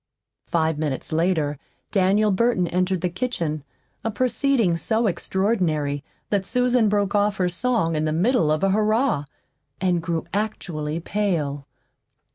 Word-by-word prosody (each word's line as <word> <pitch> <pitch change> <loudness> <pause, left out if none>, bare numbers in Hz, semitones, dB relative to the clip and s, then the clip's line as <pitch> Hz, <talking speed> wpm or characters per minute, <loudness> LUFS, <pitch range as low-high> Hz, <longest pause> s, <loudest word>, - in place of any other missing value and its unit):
Five 160 -3 0
minutes 145 -4 -3
later 160 -3 +1 0.3
Daniel 205 +2 +3
Burton 195 -2 +2
entered 180 +1 0
the 180 - +1
kitchen 170 - -3 0.4
a 225 - 0
proceeding 250 -4 +1
so 220 +7 0
extraordinary 170 -7 0 0.3
that 200 -2 +2
Susan 245 +1 +2
broke 200 -1 +1
off 205 0 +2
her 180 -1 +1
song 180 -3 0
in 155 0 0
the 155 - 0
middle 180 - +2
of 155 +3 0
a 195 - +3
"Hurrah" 215 - +2 0.5
and 180 -2 +1
grew 165 -1 -2
actually 170 -7 -2
pale. 165 -8 -2
185 Hz, 135 wpm, -23 LUFS, 160-215 Hz, 0.5 s, Daniel